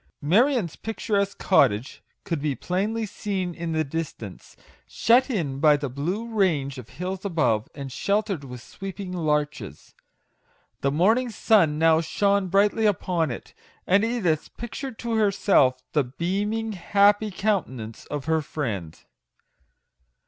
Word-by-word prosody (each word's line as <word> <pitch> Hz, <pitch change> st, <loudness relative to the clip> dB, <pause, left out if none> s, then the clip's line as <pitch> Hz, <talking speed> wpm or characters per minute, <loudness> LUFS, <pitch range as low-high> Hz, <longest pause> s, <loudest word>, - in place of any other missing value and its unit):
Marion's 210 Hz, -, +2 dB
picturesque 200 Hz, -2 st, -2 dB
cottage 115 Hz, -, +2 dB, 0.2 s
could 165 Hz, -7 st, -3 dB
be 145 Hz, -2 st, -1 dB
plainly 210 Hz, -, -1 dB
seen 190 Hz, -3 st, -3 dB
in 170 Hz, 0 st, -4 dB
the 160 Hz, 0 st, +1 dB
distance, 140 Hz, -, -7 dB, 0.3 s
shut 250 Hz, +4 st, +3 dB
in 155 Hz, -, -2 dB
by 150 Hz, -1 st, +5 dB
the 140 Hz, -1 st, -4 dB
blue 175 Hz, -, -3 dB
range 160 Hz, -, 0 dB
of 120 Hz, -, -11 dB
hills 185 Hz, +2 st, -5 dB
above, 150 Hz, -, +1 dB
and 140 Hz, -2 st, -7 dB
sheltered 200 Hz, -, -1 dB
with 125 Hz, -3 st, -9 dB
sweeping 195 Hz, -1 st, -7 dB
larches. 150 Hz, -4 st, -2 dB, 0.9 s
The 140 Hz, -, +1 dB
morning 220 Hz, -, +2 dB
sun 195 Hz, -9 st, +3 dB
now 160 Hz, 0 st, +4 dB
shone 200 Hz, +3 st, +1 dB
brightly 205 Hz, +4 st, +3 dB
upon 175 Hz, -5 st, 0 dB
it, 120 Hz, -, -7 dB, 0.3 s
and 200 Hz, +3 st, +3 dB
Edith 210 Hz, -10 st, -1 dB
pictured 240 Hz, +1 st, -6 dB
to 235 Hz, -2 st, -2 dB
herself 190 Hz, -11 st, +3 dB
the 150 Hz, -, +3 dB
beaming, 205 Hz, -, -2 dB
happy 205 Hz, +2 st, +3 dB
countenance 145 Hz, -, -2 dB
of 145 Hz, -2 st, -5 dB
her 160 Hz, 0 st, +1 dB
friend. 105 Hz, -, -4 dB
180 Hz, 130 wpm, -25 LUFS, 145-205 Hz, 0.9 s, by